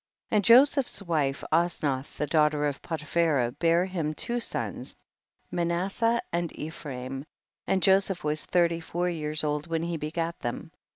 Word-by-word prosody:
15. - - +1
And 205 - +2
Joseph's 260 +2 +5
wife 150 -6 0
Osnath 155 -5 0
the 150 - 0
daughter 150 -1 +2
of 145 -1 -2
Potiphera 155 -5 0
bare 170 +1 +3
him 165 -5 -3
two 240 +8 0
sons, - - -3 0.6
Manasseh 190 +7 0
and 170 -1 -1
Ephraim, 135 -4 -6 0.4
and 190 -1 +1
Joseph 195 -1 +3
was 150 0 0
thirty 170 -2 +2
four 175 +2 -2
years 155 -2 -2
old 150 +1 -1
when 165 -1 -1
he 170 -1 -2
begat 165 +2 -3
them. 120 - -5
165 Hz, 150 wpm, -27 LUFS, 150-175 Hz, 0.6 s, Joseph's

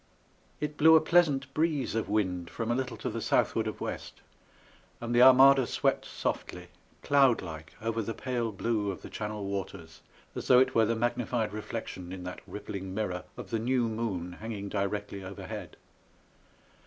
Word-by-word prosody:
It 150 0 -3
blew 160 +1 +7
a - - +8
pleasant 150 -5 +2
breeze 155 -5 0
of 115 -2 -2
wind 95 -5 0
from 115 0 -3
a - - +2
little 130 -1 -3
to - - -3
the - - -4
southward - - +1
of - - -5
west, - - -6 0.8
and 120 0 -3
the 120 - +5
Armada 130 0 +8
swept - - 0
softly, - - -4 0.3
cloud 135 -6 +4
like 80 -2 -8
over 115 0 -1
the 115 +1 -4
pale 120 -3 -2
blue 105 0 -1
of 95 - -6
the - - -9
Channel 105 -1 -4
waters 95 -4 -6 0.3
as - - -6
though 125 - +7
it 130 +1 +4
were 115 - +4
the 115 - +1
magnified 120 -2 -1
reflection 105 -4 -6
in 95 -1 -7
that 90 0 -7
rippling 95 -2 -6
mirror 95 -4 -2
of - - -8
the 115 - 0
new 125 +2 +1
moon 110 -6 -3
hanging 105 -3 -5
directly 100 0 -3
overhead. 95 +1 -7
110 Hz, 170 wpm, -29 LUFS, 100-125 Hz, 0.8 s, a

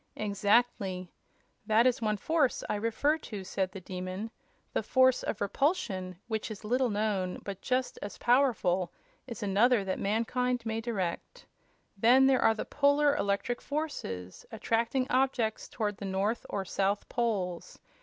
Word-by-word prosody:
"Exactly. 200 -3 +1 0.6
That 220 +2 +4
is 250 -2 +2
one 215 -1 0
force 310 +2 +1
I - - -1
refer 230 +9 +1
to," 210 -9 -7
said 190 0 -2
the 195 - -7
Demon. 185 +4 -5 0.4
"The - - +1
force 260 -1 +4
of 210 - -4
repulsion, 200 - -1
which 220 -1 -2
is 215 0 -8
little 250 +3 +1
known, 205 -3 -1
but 200 -2 -6
just 255 0 -1
as 205 - -6
powerful, 225 -9 +2 0.4
is 230 -4 -6
another 210 +3 +3
that 190 - -2
mankind 235 +3 0
may 225 0 -2
direct. 220 - -4 0.5
Then 245 +6 +5
there 265 -1 +4
are 225 - +4
the - - -4
Polar 285 0 +3
electric 240 +1 -1
forces, 190 - -4
attracting 230 +3 0
objects 255 -4 +1
toward 210 -3 -2
the 200 - -6
north 195 +4 -1
or 195 -1 -2
south 195 +2 -1
poles. 200 -8 -2
220 Hz, 145 wpm, -30 LUFS, 195-250 Hz, 0.6 s, Then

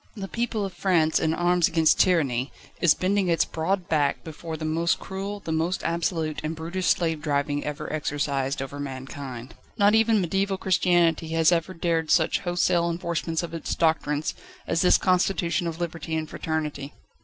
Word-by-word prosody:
The 195 -3 -5
people 225 -1 -2
of 190 - -6
France, 165 -5 +2
in 160 - +1
arms 175 -1 +3
against 160 -2 +3
tyranny, 140 -8 +2 0.3
is 170 -4 +5
bending 195 +1 +1
its 170 -1 +2
broad 175 +3 -2
back 145 -3 +1
before 160 0 -7
the 155 - -5
most 165 +2 +1
cruel, 200 +2 -5
the 165 - -5
most 165 +3 -1
absolute 165 -2 -1
and 155 +1 -3
brutish 170 +3 -3
slave 160 -3 +1
driving 145 -1 -1
ever 150 +1 -5
exercised 140 -2 -1
over 140 +1 -7
mankind. 130 -2 -7 0.2
Not 205 -1 +4
even 225 -1 +4
mediaeval 195 +2 0
Christianity 175 -3 +2
has 165 +1 +4
ever 175 +2 0
dared 165 -2 0
such 160 -2 +3
wholesale 175 -1 +1
enforcements 170 -1 -2
of 170 -1 -6
its 165 - -3
doctrines, 155 -2 0 0.3
as 165 - 0
this 180 - +5
constitution 180 -2 +1
of 165 0 -5
Liberty 165 -2 -4
and 160 -1 -2
Fraternity. 150 -3 -4
165 Hz, 165 wpm, -25 LUFS, 155-180 Hz, 0.3 s, is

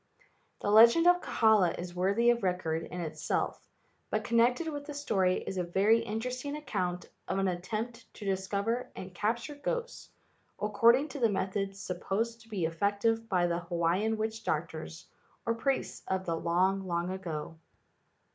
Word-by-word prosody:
The 205 - 0
legend 235 +10 +7
of 355 0 +6
Kahala 215 -6 +3
is 175 0 -6
worthy 200 +7 +3
of 235 0 -1
record 180 -4 0
in 180 - -6
it¬ 160 -2 -5
self, - - -1 0.5
but - - -1
connected 240 +7 +2
with 290 -2 -4
the 295 -1 -7
story 190 -10 +1
is 190 - -3
a - - +1
very 200 +6 +3
inter¬ 225 +1 -3
esting 285 +4 -4
account 180 - -3 0.2
of 190 - -1
an 195 0 +1
attempt 220 +7 -4
to 210 - -9
discover 200 +6 -1
and 185 0 -8
capture 230 - -1
ghosts 470 +12 -4 0.5
according 230 +7 +4
to 280 - -6
the 230 -3 +4
methods 195 0 -2
sup¬ 180 -1 -4
posed 230 +4 -1
to 225 - -19
be 195 -6 -1
effective 205 +7 0
by 180 -2 +2
the 170 0 0
Hawaiian 175 +5 0
witch 220 0 -3
doctors 160 +1 -3 0.4
or 230 - +2
priests 265 +4 -1
of 190 0 -1
the 165 - 0
long, 185 +4 +1
long 170 +1 -1
ago. 165 -4 -5
200 Hz, 165 wpm, -30 LUFS, 180-230 Hz, 0.5 s, legend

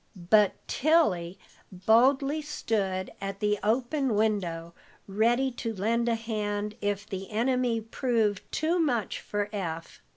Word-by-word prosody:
But 200 +3 +3
Tilly 195 - +2 0.3
boldly 265 +10 +3
stood 200 -10 -2
at 195 0 -4
the 210 -1 +1
open 245 +3 0
window, 180 -6 -1 0.3
ready 235 +6 +2
to 230 -2 -4
lend 230 +4 0
a 230 - +2
hand 210 -2 -3
if 205 0 -1
the 190 -1 -6
enemy 240 +1 +1
proved 225 -3 0
too 330 +3 0
much 245 - 0
for 205 -1 -3
Eph. 165 -5 -5
215 Hz, 125 wpm, -28 LUFS, 195-245 Hz, 0.3 s, But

